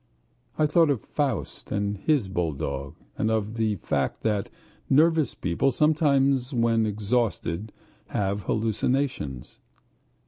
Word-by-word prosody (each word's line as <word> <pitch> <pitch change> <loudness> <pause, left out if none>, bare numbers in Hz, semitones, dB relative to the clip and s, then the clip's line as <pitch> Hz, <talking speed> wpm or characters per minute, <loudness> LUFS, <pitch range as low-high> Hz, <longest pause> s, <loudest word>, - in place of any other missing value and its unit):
I 155 - +3
thought 160 +1 +4
of 135 -6 +1
Faust 140 -8 -3
and 100 0 0
his 130 +1 +1
bulldog, 70 -6 -3 0.2
and 110 - +1
of 110 -1 0
the 110 -2 0
fact 90 - -2
that 105 0 0 0.4
nervous 155 0 +3
people 90 +10 +1
sometimes 140 -3 +2
when 115 -2 +2
exhausted 105 -3 -1 0.4
have 100 0 -1
hallucinations. 110 - -1
110 Hz, 110 wpm, -26 LUFS, 100-140 Hz, 0.4 s, thought